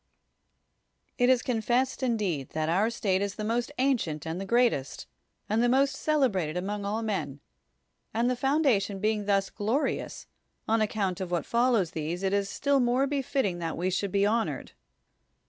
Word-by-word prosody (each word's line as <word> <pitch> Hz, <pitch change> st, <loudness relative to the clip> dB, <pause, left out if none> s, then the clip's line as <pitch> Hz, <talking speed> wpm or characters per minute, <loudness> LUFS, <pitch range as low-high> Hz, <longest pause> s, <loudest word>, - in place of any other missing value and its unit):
It 245 Hz, 0 st, +4 dB
is 255 Hz, -1 st, +4 dB
confessed 245 Hz, +3 st, 0 dB
indeed 205 Hz, -, -1 dB
that 155 Hz, 0 st, -1 dB
our 195 Hz, +7 st, +2 dB
state 200 Hz, -5 st, 0 dB
is 200 Hz, 0 st, -2 dB
the 215 Hz, -, -5 dB
most 235 Hz, +4 st, -1 dB
ancient 230 Hz, -, 0 dB
and 165 Hz, +3 st, -4 dB
the 195 Hz, -, -5 dB
greatest, 235 Hz, -, +1 dB, 0.4 s
and 215 Hz, +2 st, +1 dB
the 240 Hz, -, +3 dB
most 270 Hz, +2 st, +3 dB
celebrated 225 Hz, -, +1 dB
among 200 Hz, +2 st, -3 dB
all 215 Hz, +3 st, -2 dB
men; 190 Hz, -10 st, -3 dB, 0.7 s
and 230 Hz, +3 st, +1 dB
the 250 Hz, -, +1 dB
foundation 255 Hz, -7 st, +1 dB
being 210 Hz, +1 st, 0 dB
thus 195 Hz, -1 st, +1 dB
glorious, 225 Hz, +8 st, -2 dB, 0.4 s
on 225 Hz, 0 st, +2 dB
account 200 Hz, -4 st, -1 dB
of 185 Hz, -, -3 dB
what 175 Hz, -1 st, -1 dB
follows 235 Hz, -7 st, +2 dB
these 165 Hz, +4 st, -4 dB
it 190 Hz, 0 st, +1 dB
is 200 Hz, -1 st, 0 dB
still 280 Hz, +4 st, +1 dB
more 250 Hz, +2 st, +2 dB
befitting 270 Hz, -9 st, -1 dB
that 165 Hz, -1 st, -3 dB
we 185 Hz, +2 st, 0 dB
should 195 Hz, +1 st, -1 dB
be 200 Hz, +1 st, +2 dB
honored. 225 Hz, +2 st, -1 dB
215 Hz, 165 wpm, -28 LUFS, 190-245 Hz, 0.7 s, It